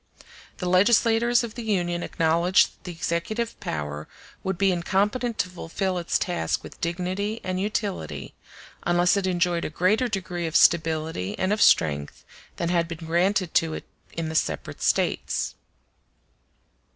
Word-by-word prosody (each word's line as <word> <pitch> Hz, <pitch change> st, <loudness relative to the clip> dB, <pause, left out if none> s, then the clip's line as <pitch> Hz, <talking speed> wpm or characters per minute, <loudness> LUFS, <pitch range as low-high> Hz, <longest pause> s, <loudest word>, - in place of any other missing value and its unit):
The 180 Hz, -, -3 dB
legislators 230 Hz, +5 st, +4 dB
of 230 Hz, -2 st, -5 dB
the 240 Hz, -, -6 dB
Union 175 Hz, -6 st, 0 dB
acknowledged 170 Hz, +3 st, +3 dB
that -, -, -29 dB
the 180 Hz, -, -4 dB
executive 175 Hz, +8 st, -2 dB
power 75 Hz, 0 st, -4 dB, 0.4 s
would 190 Hz, -2 st, -2 dB
be 195 Hz, 0 st, +3 dB
incompetent 205 Hz, +7 st, 0 dB
to 185 Hz, -, 0 dB
fulfil 180 Hz, +1 st, -3 dB
its 170 Hz, -, 0 dB
task 175 Hz, -2 st, -1 dB
with -, -, -12 dB
dignity 185 Hz, +6 st, -2 dB
and 185 Hz, 0 st, -2 dB
utility, 205 Hz, -1 st, -3 dB, 0.5 s
unless 175 Hz, +1 st, +3 dB
it 195 Hz, -2 st, 0 dB
enjoyed 175 Hz, -1 st, +1 dB
a -, -, -2 dB
greater 190 Hz, +10 st, +2 dB
degree 180 Hz, -5 st, -3 dB
of 160 Hz, -, -6 dB
stability 160 Hz, -, +2 dB
and 190 Hz, +2 st, +1 dB
of 210 Hz, -, -1 dB
strength 75 Hz, -2 st, +3 dB, 0.3 s
than 170 Hz, -, -2 dB
had 170 Hz, -1 st, +2 dB
been 165 Hz, -1 st, -7 dB
granted 180 Hz, +2 st, +1 dB
to 160 Hz, -1 st, +2 dB
it -, -, -6 dB, 0.3 s
in 165 Hz, -1 st, -3 dB
the 160 Hz, -, -4 dB
separate 160 Hz, -, -2 dB
States. -, -, 0 dB
180 Hz, 150 wpm, -25 LUFS, 170-200 Hz, 0.5 s, legislators